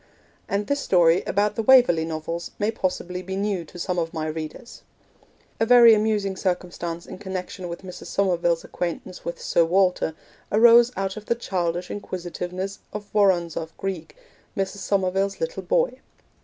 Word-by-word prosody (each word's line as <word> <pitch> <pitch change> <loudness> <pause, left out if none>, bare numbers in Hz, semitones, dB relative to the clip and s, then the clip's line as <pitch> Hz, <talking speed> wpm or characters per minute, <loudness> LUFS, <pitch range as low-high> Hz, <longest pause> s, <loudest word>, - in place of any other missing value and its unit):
And 200 +1 0
this 285 +4 0
story 175 -6 +4
about 205 +1 +1
the - - 0
Waverley 225 -10 +5
Novels 165 +1 -4
may 210 +2 0
possibly 180 -3 -3
be 190 +1 -5
new 195 -2 -1
to 175 - -13
some 180 0 -1
of 165 0 -3
my 155 -1 -2
readers: 155 +9 -6 0.8
A 225 - +3
very 240 -1 +8
amusing 210 -2 +1
circumstance 175 -2 -3
in - - -9
connection 185 -2 -5
with 170 +2 -7
Mrs. 180 -1 -9
Somerville's 175 -3 +1
acquaintance 180 +1 -5
with 170 - -5
Sir 170 - +2
Walter 180 -2 +2 0.4
arose 235 +2 +7
out 195 +1 -2
of 215 - -9
the 235 - +2
childish 180 -5 -2
inquisitiveness 185 0 -5
of 210 -1 -8
Woronzow 175 -6 +2
Greig, 190 -4 -5 0.4
Mrs. 195 +1 -2
Somerville's 195 0 0
little 485 +1 -3
boy. - - 0
190 Hz, 155 wpm, -24 LUFS, 175-205 Hz, 0.8 s, very